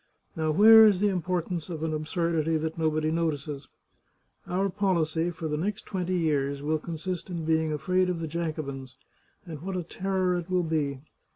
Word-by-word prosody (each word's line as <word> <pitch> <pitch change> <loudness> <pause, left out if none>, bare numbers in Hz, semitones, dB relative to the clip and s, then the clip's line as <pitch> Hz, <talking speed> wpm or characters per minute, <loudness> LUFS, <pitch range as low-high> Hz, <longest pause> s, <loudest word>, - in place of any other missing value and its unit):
Now 160 -1 -1
where 220 +6 +8
is 200 -4 +3
the 205 +1 +3
importance 180 -2 -2
of 160 -2 -5
an 160 -1 -1
absurdity 160 0 0
that 160 +1 -3
nobody 155 -1 0
notices? 150 -4 -2 0.8
Our 190 +2 0
policy 175 -4 0
for 165 -1 -5
the 150 -1 -2
next 200 +6 -3
twenty 185 -2 -2
years 140 -4 0
will 155 +1 0
consist 170 +3 -5
in 170 -3 -4
being 160 -1 +1
afraid 185 +4 +1
of 175 -2 -2
the 165 - -3
Jacobins, 150 -5 -5 0.5
and 160 -5 -8
what 190 +1 -4
a 180 - -2
terror 185 +1 -1
it 175 +1 -8
will 180 -1 +1
be! 145 -4 -1
165 Hz, 175 wpm, -27 LUFS, 155-180 Hz, 0.8 s, where